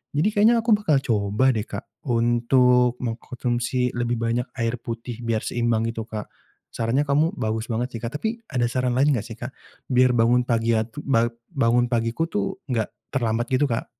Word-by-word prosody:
Jadi 155 Hz, +7 st, +3 dB
kayaknya 220 Hz, +3 st, +5 dB
aku 230 Hz, -, +1 dB
bakal 160 Hz, -9 st, +2 dB
coba 110 Hz, +2 st, +2 dB
deh, 110 Hz, +1 st, -2 dB
Kak, -, -, -6 dB, 0.2 s
untuk 125 Hz, +1 st, +3 dB
mengkonsumsi 120 Hz, +1 st, -2 dB
lebih 120 Hz, 0 st, 0 dB
banyak 120 Hz, +2 st, 0 dB
air 115 Hz, +1 st, -1 dB
putih 115 Hz, 0 st, -6 dB
biar 115 Hz, -2 st, -1 dB
seimbang 120 Hz, -2 st, 0 dB
gitu, 115 Hz, -1 st, -5 dB
Kak. 105 Hz, -2 st, -6 dB, 0.4 s
Sarannya 120 Hz, +6 st, 0 dB
kamu 155 Hz, +7 st, +2 dB
bagus 110 Hz, +1 st, -2 dB
banget 120 Hz, +3 st, -2 dB
sih, -, -, -10 dB
Kak. 125 Hz, +6 st, -3 dB
Tapi 225 Hz, +1 st, -3 dB
ada 125 Hz, -4 st, +1 dB
saran 125 Hz, 0 st, 0 dB
lain 145 Hz, +2 st, +4 dB
enggak 110 Hz, -, -3 dB
sih, 115 Hz, -, -8 dB
Kak, 125 Hz, +2 st, -6 dB, 0.4 s
biar 125 Hz, 0 st, +4 dB
bangun 120 Hz, +1 st, +4 dB
pagi 115 Hz, -1 st, +1 dB
atu 110 Hz, +6 st, -3 dB, 0.5 s
bangun 120 Hz, -3 st, +3 dB
pagiku 115 Hz, +5 st, 0 dB
tuh 100 Hz, -, -2 dB
enggak 115 Hz, -3 st, 0 dB, 0.2 s
terlambat 120 Hz, -3 st, 0 dB
gitu, 135 Hz, +3 st, +3 dB
Kak. 115 Hz, -, -1 dB
120 Hz, 175 wpm, -24 LUFS, 115-130 Hz, 0.5 s, kayaknya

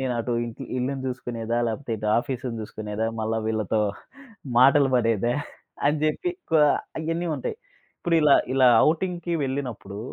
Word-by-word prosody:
నేను 130 Hz, -1 st, -1 dB
అటు 120 Hz, +1 st, -2 dB
ఇంటి 115 Hz, -1 st, -7 dB
ఇల్లుని 130 Hz, +2 st, -2 dB
చూసుకునేదా? 120 Hz, -2 st, -3 dB
లేపోతే 115 Hz, +3 st, -5 dB
ఇటు 105 Hz, 0 st, -3 dB
ఆఫీసును 125 Hz, -2 st, -4 dB
చూసుకునేదా? 110 Hz, +1 st, -4 dB
మళ్ళా 110 Hz, +1 st, -1 dB
వీళ్ళతో 110 Hz, -1 st, 0 dB, 0.8 s
మాటలు 135 Hz, +2 st, +6 dB
పడేదా? 115 Hz, 0 st, +2 dB, 0.5 s
అని 150 Hz, +2 st, +3 dB
చెప్పి 350 Hz, -, 0 dB, 0.2 s
క -, -, -1 dB, 0.5 s
ఇయన్నీ 165 Hz, +2 st, -2 dB
ఉంటాయి. 130 Hz, -, -4 dB, 0.4 s
ఇప్పుడు 170 Hz, -1 st, +1 dB
ఇలా 150 Hz, -2 st, +6 dB, 0.2 s
ఇలా 130 Hz, -1 st, +5 dB, 0.2 s
ఔటింగ్‌కి 175 Hz, +1 st, -2 dB
వెళ్ళినప్పుడు 125 Hz, -7 st, -4 dB
125 Hz, 135 wpm, -25 LUFS, 115-145 Hz, 0.8 s, మాటలు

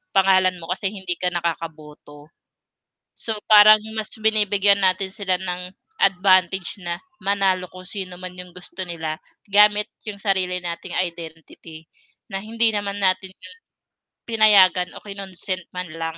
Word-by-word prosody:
pangalan 190 Hz, -1 st, +4 dB
mo, 175 Hz, 0 st, -8 dB
kasi 190 Hz, +1 st, -1 dB
hindi 190 Hz, -3 st, -4 dB
ka 180 Hz, -, -1 dB
nakakaboto. 155 Hz, -3 st, -6 dB, 0.8 s
So, 220 Hz, -2 st, -4 dB
parang 215 Hz, 0 st, +8 dB, 0.2 s
mas 215 Hz, -1 st, -4 dB
binibigyan 205 Hz, -2 st, +3 dB
natin 190 Hz, +1 st, +1 dB
sila 190 Hz, -3 st, -1 dB
ng 180 Hz, 0 st, -5 dB, 0.3 s
advantage 185 Hz, -1 st, +2 dB
na 170 Hz, 0 st, -4 dB, 0.2 s
manalo, 190 Hz, -2 st, 0 dB
kung 185 Hz, 0 st, -12 dB
sino 185 Hz, -3 st, -6 dB
man 185 Hz, 0 st, -7 dB
yung 180 Hz, -1 st, -11 dB
gusto 180 Hz, +1 st, -10 dB
nila 160 Hz, -3 st, -5 dB, 0.3 s
gamit 210 Hz, +1 st, +4 dB, 0.2 s
yung 200 Hz, -1 st, -6 dB
sarili 185 Hz, -2 st, 0 dB
nating 170 Hz, -1 st, -6 dB
identity, 165 Hz, -2 st, -7 dB, 0.4 s
na 195 Hz, -3 st, -5 dB
hindi 230 Hz, +1 st, +1 dB
naman 205 Hz, 0 st, -3 dB
natin 185 Hz, -1 st, 0 dB
'yun 460 Hz, -, -14 dB, 0.7 s
pinayagan 200 Hz, -5 st, +4 dB
o -, -, -14 dB
kinonsent 190 Hz, -3 st, -6 dB
man 180 Hz, 0 st, -4 dB
lang. 165 Hz, 0 st, -5 dB
185 Hz, 135 wpm, -22 LUFS, 175-200 Hz, 0.8 s, parang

